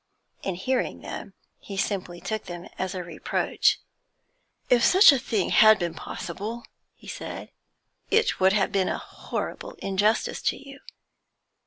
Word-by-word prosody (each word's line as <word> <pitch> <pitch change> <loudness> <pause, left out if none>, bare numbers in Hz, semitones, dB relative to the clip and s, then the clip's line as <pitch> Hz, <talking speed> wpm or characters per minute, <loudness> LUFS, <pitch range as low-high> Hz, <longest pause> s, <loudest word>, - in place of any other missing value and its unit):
In 190 - -3
hearing 255 +9 -1
them, - - -8 0.2
he 195 - -8
simply 185 -3 -2
took 220 +2 -4
them 175 0 -7
as 190 0 -2
a 180 - -3
reproach. 170 - +1 0.9
'If 245 -1 +4
such 380 -2 +8
a 275 - +2
thing 215 -5 -1
had 215 0 +7
been 170 -3 -2
possible,' 225 +7 -6 0.3
he - - -17
said, - - -7 0.6
'it 445 -1 +2
would 190 +1 +5
have 195 -2 +2
been 190 -2 +1
a - - -1
horrible - - -6
injustice 205 +3 0
to - - 0
you. 275 0 -12
200 Hz, 145 wpm, -26 LUFS, 185-235 Hz, 0.9 s, such